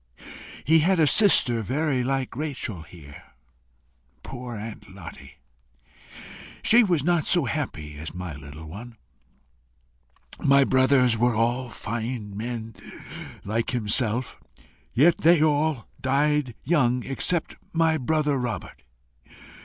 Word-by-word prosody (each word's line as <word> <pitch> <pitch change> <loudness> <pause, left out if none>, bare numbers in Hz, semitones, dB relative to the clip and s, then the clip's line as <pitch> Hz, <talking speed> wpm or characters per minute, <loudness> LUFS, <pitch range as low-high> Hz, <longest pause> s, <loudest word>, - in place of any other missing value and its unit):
He 160 +2 +5
had 180 +3 +2
a 160 - +5
sister 140 - +4
very 135 +3 -1
like 135 -1 -2
Rachel 135 - -4
here. 80 -3 -13 1.0
Poor 125 -2 -7
Aunt 110 0 -8
Lottie! 100 - -11 1.3
She 240 +2 +6
was 175 -9 +1
not 175 -2 +1
so 175 -6 +4
happy 80 - -4
as 80 +1 -6
my 90 -3 -6
little 75 +2 -11
one. 115 +9 -10 1.4
My 140 0 +5
brothers 130 -3 +3
were 120 0 +2
all 120 +3 0
fine 115 -2 -5
men 115 0 -5 0.7
like 110 +3 -2
himself, 120 +1 -1 0.5
yet 165 +7 +4
they 165 -1 +5
all 150 -4 +1
died 140 -1 +1
young 125 -6 +2
except 155 +5 -2
my 160 -1 +2
brother 150 0 0
Robert. 120 -3 -5
125 Hz, 115 wpm, -25 LUFS, 110-150 Hz, 1.4 s, She